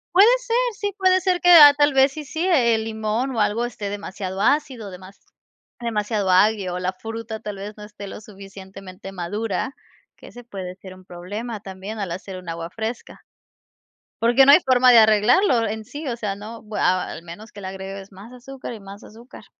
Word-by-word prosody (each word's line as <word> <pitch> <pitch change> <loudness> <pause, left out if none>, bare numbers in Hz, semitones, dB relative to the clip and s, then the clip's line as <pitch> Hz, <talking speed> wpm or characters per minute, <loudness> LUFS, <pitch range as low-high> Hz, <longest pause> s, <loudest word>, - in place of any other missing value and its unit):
Puede 395 +3 +8
ser, - - -3 0.2
sí, 405 -1 -2
puede 370 -1 +3
ser 365 -2 0
que, 355 - +3
ah, 295 -4 +10
tal 290 -1 +3
vez 270 +1 +4
sí 305 0 -7
sí, 320 +5 -3
el 235 -10 +2
limón 220 +4 -2
o - - -1
algo 210 +3 +1
esté 215 -4 -6
demasiado 195 -1 -6
ácido, 260 -4 0
demas 185 +1 -13 0.6
demasiado 210 -4 -1
agrio 190 -1 +3
o - - -3
la 185 +1 -2
fruta 225 +2 -7
tal 210 -2 -7
vez, 205 +2 -8
no 210 - -10
esté 205 -1 -10
lo - - -8
suficientemente 195 -2 -11
madura, 205 - -4 0.4
que - - -15
ese 245 0 -12
puede 190 -5 -8
ser 185 -1 -12
un 185 0 -18
problema 205 +6 -7
también 195 +2 -8
al 190 -4 -4
hacer 185 +1 -7
un 180 -2 -10
agua 165 0 -5
fresca. 225 +1 -6 1.0
Porque 240 +4 +5
no 280 - +8
hay 330 - +8
forma 255 -1 +4
de 235 - +8
arreglarlo 230 - +4
en 220 +1 -5
sí, 295 +4 -8
o 240 - -2
sea, 205 -4 -3
no, 220 +3 -9
bu 215 -1 -10
a 185 0 +1
al 165 - -8
menos 205 +6 -11
que 205 - -11
le 190 - -6
agregues 195 +1 -8
más 200 +6 -13
azúcar 255 0 -9
y 220 - -9
más 195 0 -12
azúcar. 235 +3 -14
215 Hz, 200 wpm, -22 LUFS, 195-245 Hz, 1.0 s, ah